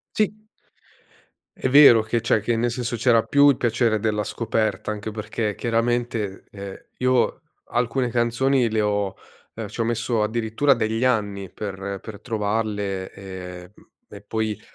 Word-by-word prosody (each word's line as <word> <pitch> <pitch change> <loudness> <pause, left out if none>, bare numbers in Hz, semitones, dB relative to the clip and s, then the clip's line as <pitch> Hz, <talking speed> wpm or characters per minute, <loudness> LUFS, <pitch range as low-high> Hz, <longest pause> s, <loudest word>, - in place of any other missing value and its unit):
Sì. 215 -1 +2 1.2
È 130 - -1
vero 135 -4 +8
che 115 +2 0
c'è 115 -1 +1
che 115 +2 0
nel 120 +1 +1
senso 120 0 -3
c'era 115 -1 +4
più 145 0 +5
il 140 - +4
piacere 115 -2 +1
della 105 -1 0
scoperta 110 -3 -1
anche 105 +1 -5
perché, 105 0 -3
chiaramente, 115 -3 -1
ehm, 100 -1 -8 0.2
io 125 -1 +1 0.2
alcune 125 +1 0
canzoni 120 +2 +2
le 110 0 +1
ho 105 -2 0 0.4
ehm, 110 -2 -6
ci - - -10
ho 115 - +2
messo 115 0 0
addirittura 115 +5 +2
degli 115 0 0
anni 100 -6 0
per 100 -1 -5
per 105 -3 -9
trovarle 105 -4 -2
e 90 -2 -9
mhmm, - - -21 0.3
e - - -13
poi, 110 0 -2
110 Hz, 150 wpm, -23 LUFS, 105-120 Hz, 1.2 s, vero